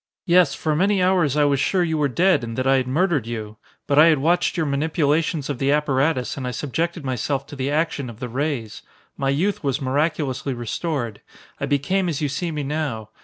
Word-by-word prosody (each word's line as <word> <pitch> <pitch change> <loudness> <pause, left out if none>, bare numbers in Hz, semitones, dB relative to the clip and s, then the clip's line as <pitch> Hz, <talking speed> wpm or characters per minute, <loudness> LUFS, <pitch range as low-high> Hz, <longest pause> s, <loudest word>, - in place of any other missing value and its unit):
Yes, 175 -4 +4
for 155 -1 -1
many 195 +4 +2
hours 180 -6 +2
I 150 - +4
was 140 -2 +2
sure 180 +6 +2
you 160 -2 -1
were 145 - +3
dead 175 +3 +2
and 115 -1 -5
that 130 - -1
I 135 0 +4
had 130 -1 -1
murdered 150 - +1
you. 110 -2 -6 0.3
But 145 0 +3
I 155 - +8
had 160 -2 +5
watched 175 +6 +1
your 165 - +1
manipulations 150 +1 0
of 140 -4 -4
the 135 0 +2
apparatus 145 -2 +1
and 130 -2 -4
I - - -1
subjected 165 +5 -3
myself 135 +2 -2
to 145 - -10
the 135 0 -2
action 150 -3 -1
of 115 -1 -11
the 125 - -4
rays. 125 -4 -3 0.3
My 135 -1 -1
youth 175 +9 0
was 140 0 0
miraculously 140 -1 -1
restored. 120 -1 -3 0.4
I 140 - -2
became 175 +7 +1
as 155 -4 -2
you 150 -2 -1
see 170 +6 -2
me 150 -2 -3
now. 135 -7 -3
145 Hz, 215 wpm, -22 LUFS, 130-160 Hz, 0.4 s, I